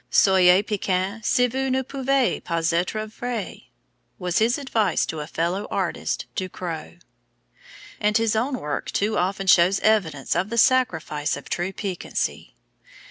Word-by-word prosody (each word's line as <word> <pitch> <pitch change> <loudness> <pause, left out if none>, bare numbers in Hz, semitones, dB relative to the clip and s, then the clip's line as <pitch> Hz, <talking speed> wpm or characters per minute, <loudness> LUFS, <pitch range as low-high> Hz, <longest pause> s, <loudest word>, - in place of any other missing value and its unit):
"Soyez 190 0 +5
piquant, 200 0 -2
si 245 +4 +3
vous 265 +2 -1
ne 260 0 +1
pouvez 270 -1 0
pas 165 0 0
être 185 +6 -1
vrai," 230 -1 -6 0.5
was 180 -2 0
his 230 +3 +2
advice 225 - 0
to 160 - -5
a 150 - -5
fellow 170 +5 -2
artist, - - -2
Ducreux; 180 -4 -5 1.0
and 210 0 +2
his 225 -1 +1
own 255 +4 0
work 150 - -4
too 210 +2 0
often 195 +1 -1
shows 185 +1 +5
evidence 175 -11 +1
of 180 +4 0
the 235 - -3
sacrifice 170 - +2
of 140 - -11
truth 180 +2 -2
to - - -8
piquancy. 190 -3 -3
195 Hz, 145 wpm, -23 LUFS, 175-230 Hz, 1.0 s, Soyez